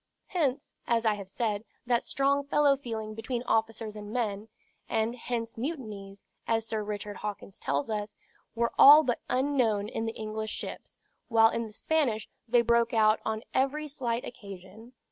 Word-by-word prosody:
Hence, 290 -6 -1
as 230 -1 +1
I 220 - +4
have 200 -2 -7
said, 210 0 -1 0.2
that 240 -1 +2
strong 280 +1 +1
fellow 290 -1 +4
feeling 225 -5 -5
between 235 +2 -3
officers 220 -2 -1
and 210 0 -8
men; 215 -3 -2 0.4
and 225 +1 0
hence 230 -1 -4
mutinies 215 -9 -5 0.2
(as 225 -1 +1
Sir 220 -1 -2
Richard 205 0 -5
Hawkins 205 -2 -6
tells 140 +1 -1
us) 210 0 -3 0.4
were 235 0 0
all 295 +3 +10
but 245 -4 -1
unknown 250 -6 +1
in 225 +1 -3
the 225 - -4
English 215 0 -4
ships, - - -6 0.3
while 225 -2 +5
in 230 -1 -2
the - - -12
Spanish 240 -3 0 0.2
they 235 0 +4
broke 235 0 +2
out 215 -1 +4
on 220 +1 -2
every 285 +3 +1
slight 250 -5 -2
occasion. 205 +1 -11
225 Hz, 165 wpm, -29 LUFS, 215-250 Hz, 0.4 s, all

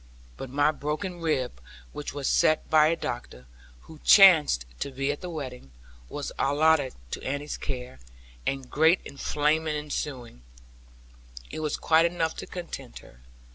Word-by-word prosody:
But 130 - -7
my 145 +3 +2
broken 155 +5 -4
rib, 130 - -1 0.3
which 150 - -6
was 140 -2 -4
set 155 - +3
by 155 -1 +6
a 165 - +2
doctor, 120 - -6 0.4
who 160 - -14
chanced 160 - +7
to - - -3
be 135 +1 -1
at 145 - -6
the 180 - -6
wedding, 130 - -7 0.4
was 145 - -5
allotted 145 -1 +2 0.2
to - - -4
Annie's 145 +2 -3
care; 125 - -6 0.4
and 135 - -3
great 160 +6 +3
inflammation 150 +2 0
ensuing, 135 - -5 1.1
it - - -5
was 155 -1 -2
quite 165 +1 +4
enough 165 -2 -2
to - - -7
content 170 - -8
her. 60 0 -18
150 Hz, 145 wpm, -27 LUFS, 135-160 Hz, 1.1 s, chanced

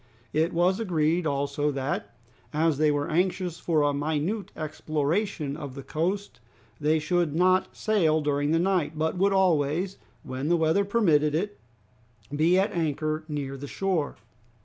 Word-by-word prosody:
It 160 +3 +2
was 180 +4 +2
agreed 170 -4 +1
also 140 +1 0
that 135 -1 -3 0.4
as 155 -1 +1
they 155 -1 +4
were 145 -1 0
anxious 180 +1 0
for 155 -3 +1
a 145 0 +2
minute 155 +8 -2
exploration 155 +1 -2
of 140 -3 -7
the 140 - -7
coast 165 +1 -2 0.4
they 150 +2 +2
should 165 0 0
not 185 +2 +2
sail 170 -8 +2
during 145 -1 0
the 165 - +3
night, 175 -3 +1
but 160 +2 0
would 200 +1 +3
always, 180 -1 +1 0.2
when 130 +3 -4
the 175 - +4
weather 160 +5 +2
permitted 160 -9 +3
it, 205 +5 -2 0.8
be 165 +5 +4
at 195 +2 +2
anchor 155 -1 -1
near 145 -3 -4
the 140 +1 -7
shore. 180 -3 -1
160 Hz, 150 wpm, -27 LUFS, 145-180 Hz, 0.8 s, they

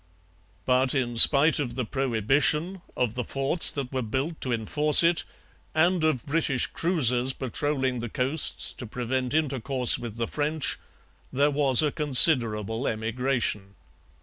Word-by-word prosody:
But 130 +1 0
in 120 -3 -3
spite 145 +5 +6
of 130 -5 -5
the 125 - -4
prohibition, 135 - -1 0.2
of 120 -3 -2
the 125 - -5
forts 135 +7 +3
that 135 -2 -5
were 130 - -3
built 135 +8 -5
to 130 - -1
enforce 150 +8 +3
it, 165 -3 +1 0.5
and 170 +2 +1
of 155 -7 -1
British 140 -4 0
cruisers 130 -7 -1
patrolling 130 0 -3
the 120 0 -7
coasts 135 +7 -1
to 120 - -10
prevent 125 +3 -4
intercourse 135 -4 -1
with 115 -3 -9
the 115 0 -4
French, 150 0 -3 0.5
there 145 +3 0
was 140 -2 +3
a 150 - -1
considerable 125 -6 +4
emigration. 110 -3 -4
130 Hz, 140 wpm, -24 LUFS, 120-150 Hz, 0.5 s, spite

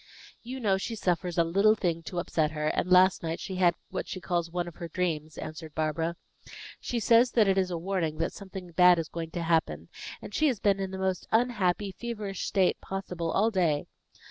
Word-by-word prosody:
"You 255 +3 -6
know 200 -5 +2
she 225 +4 -4
suffers 180 -3 -1
a 170 - +5
little 200 +6 +4
thing 170 -5 -1
to 180 - -6
upset 160 -2 0
her; 150 0 0
and 180 - -1
last 185 0 +6
night 165 0 -3
she 190 - -5
had 175 -2 +4 0.2
what - - -3
she 185 - -5
calls 175 -2 -1
one 175 0 -2
of 175 - -10
her 170 - -5
dreams," 160 -3 -2
answered 155 0 -7
Barbara. 160 +2 -1 0.6
"She 240 - -2
says 235 +2 +4
that 220 -4 +4
it 195 - +3
is 190 -1 +1
a 175 - -2
warning 165 -3 -2
that 165 - -1
something 190 -3 -9
bad 180 +1 +6
is 165 -2 -3
going 165 -1 -5
to 170 +1 -4
happen, 140 - 0 0.3
and - - -10
she 310 - +3
has 250 -7 0
been 200 -1 +2
in 190 -1 -2
the 190 - -6
most 190 -1 -2
unhappy, 210 -5 +1
feverish 210 -3 -5
state 190 -3 +2
possible 180 -3 -4
all 215 +6 +2
day. 165 -7 +1
180 Hz, 215 wpm, -28 LUFS, 165-195 Hz, 0.6 s, last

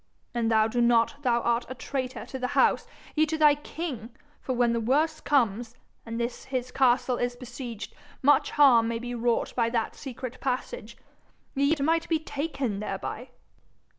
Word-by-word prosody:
An' 235 -1 0
thou 220 -1 +4
do 240 +2 0
not, 235 +4 +3
thou 240 -3 +2
art 235 +1 0
a 260 - -5
traitor 260 -1 -4
to 265 - -7
the 250 - -1
house, - - +3 0.3
yea 310 0 +3
to 315 +1 -2
thy 300 -2 +6
king, 290 -5 -6 0.3
for 260 - -2
when 240 -1 +2
the 235 - 0
worst 305 +7 +1
comes, 235 -4 +1 0.3
and 230 +1 -4
this 235 +1 -3
his 255 -2 -3
castle 255 -1 +2
is 245 0 -1
besieged, 245 -3 -7 0.3
much 290 +2 +4
harm 250 -6 +5
may 230 0 -1
be 245 +1 -5
wrought 235 0 0
by 230 -2 +2
that 230 -2 -1
secret 255 -2 -7
passage, 270 - -3 0.6
yea, 280 +2 +2
it 305 - -3
may 325 +3 +3
be 325 - +3
taken 280 -8 -3
thereby.' 210 +4 -5
250 Hz, 175 wpm, -27 LUFS, 235-280 Hz, 0.6 s, thy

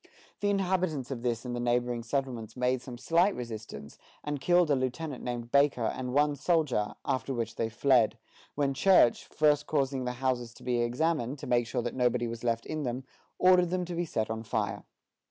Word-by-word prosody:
The 205 - +1
inhabitants 185 -9 0
of 125 -3 -4
this 120 0 -2
and 120 -1 -3
the - - -3
neighboring 120 0 0
settlements 120 -2 -3
made 125 0 +1
some 125 -2 -8
slight 170 +9 +2
resistance, 110 -11 -8 0.2
and 145 -2 -3
killed 175 +1 +3
a - - +5
lieutenant 130 +2 -3
named 120 -1 -4
Baker, 140 -3 +3
and 125 +2 -2
one 145 +2 +3
soldier, 145 -8 0
after 130 +1 -1
which 115 -1 -2
they 115 - -1
fled; 115 -2 +3 0.4
when 140 -1 +1
Church, 135 -4 +4
first 150 -1 +2
causing 135 -3 0
the 125 - -2
houses 125 -2 -2
to - - -15
be 125 -1 0
examined, 130 +2 0
to - - -8
make 120 -1 +1
sure 125 -1 -2
that 120 - -3
nobody 125 -1 +1
was 115 0 -6
left 115 -1 0
in 155 -1 -3
them, 125 -1 -3 0.3
ordered 180 -1 +5
them 180 0 -1
to 175 - -6
be 175 +1 -1
set 110 -8 -2
on 110 0 -3
fire. 105 -3 -3
125 Hz, 195 wpm, -29 LUFS, 120-150 Hz, 0.4 s, a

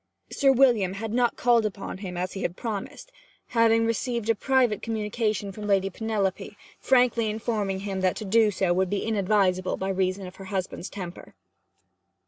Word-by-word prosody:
Sir 275 -1 +4
William 240 -8 +3
had 215 +2 -5
not 245 0 +2
called 240 -2 +3
upon 200 -2 -5
him 180 -3 -6
as 180 +1 -3
he 195 - -5
had 175 - -2
promised, 220 - -5 0.4
having 230 -1 +3
received 230 0 0
a - - +3
private 245 -2 +1
communication 215 -2 -2
from 210 +2 -7
Lady 195 -1 +2
Penelope, 205 -2 -2 0.2
frankly 245 -3 +3
informing 210 -3 -2
him 195 -1 -3
that 185 -1 +2
to 215 - -6
do 220 +2 +4
so 185 -3 +1
would 185 +1 +1
be 205 - -2
inadvisable, 195 -3 +1
by 190 - -3
reason 190 0 -1
of 180 0 -10
her 195 - -9
husband's 190 -1 -4
temper. 180 -3 -8
210 Hz, 170 wpm, -26 LUFS, 190-230 Hz, 0.4 s, Sir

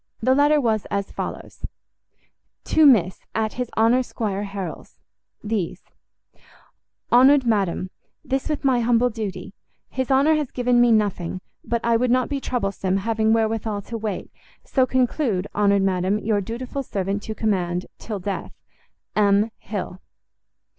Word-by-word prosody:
The 260 - +3
letter 290 +2 +4
was 220 -5 0
as 200 -1 -3
follows: - - -7 1.0
To 315 -1 +5
Miss, 190 -9 +4 0.2
at 220 -1 0
his 250 -1 -3
Honour 230 +3 +4
Squire 205 -5 -3
Harrel's 195 -2 -7 0.5
These: 195 -5 -3 1.3
Honoured 265 +2 +6
Madam, 195 -4 0 0.3
This 270 +2 -2
with 300 -2 -2
my 260 -3 +3
humble 240 +1 +2
duty. 195 -3 -5 0.4
His 260 0 -2
Honour 275 +4 +4
has 300 -4 0
given 245 -1 +2
me 240 -1 +5
nothing. 200 -5 0 0.2
But 235 -1 -1
I 235 -1 +4
would 250 +2 +1
not 255 +1 +2
be 280 -2 -2
troublesome, 195 -6 -1
having 220 +2 +1
wherewithal 220 -2 0
to 230 - -6
wait, 210 -3 -4 0.3
so 260 -2 +1
conclude, 250 -6 0
Honoured 200 -1 +3
Madam, 190 +1 +1
your 215 -1 0
dutiful 245 +6 -5
servant 200 -4 -3
to 220 - -6
command, 180 -5 -1
till 215 -2 -5
death, 195 +1 -5 0.6
M. 205 +1 +3
HILL. 190 -3 -6
220 Hz, 140 wpm, -23 LUFS, 200-250 Hz, 1.3 s, Honoured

